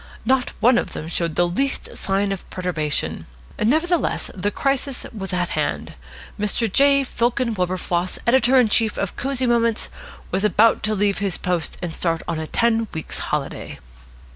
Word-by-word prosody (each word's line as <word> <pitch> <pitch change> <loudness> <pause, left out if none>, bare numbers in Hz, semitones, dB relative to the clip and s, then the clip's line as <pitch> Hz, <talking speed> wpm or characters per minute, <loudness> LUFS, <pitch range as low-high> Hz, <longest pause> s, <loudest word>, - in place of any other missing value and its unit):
Not 260 +1 +1
one 240 +1 +5
of - - -5
them 155 - -5
showed 170 -1 -1
the 175 - +3
least 270 +11 -2
sign 195 +1 0
of 195 - -5
perturbation. 165 -5 -2 0.3
Nevertheless, 320 +9 +1
the 200 +2 -1
crisis 275 +2 -1
was 195 -3 -5
at 180 -1 0
hand. - - -2 0.5
Mr. 210 0 0
J. 275 0 +5
Fillken 240 -1 0
Wilberfloss, 180 -1 -1
editor 250 +1 +4
in 245 - +5
chief 220 0 +2
of 200 - -2
Cosy 260 -1 -1
Moments, 230 -2 +1 0.4
was 190 +2 0
about 215 +2 +4
to 215 - +1
leave 200 0 +1
his 195 -4 -1
post 175 -3 -1
and 170 -2 -3
start 165 -2 0
on 165 -2 -2
a 160 - -4
ten 230 +2 +1
weeks' 160 - -4
holiday. - - -3
210 Hz, 165 wpm, -22 LUFS, 180-245 Hz, 0.5 s, one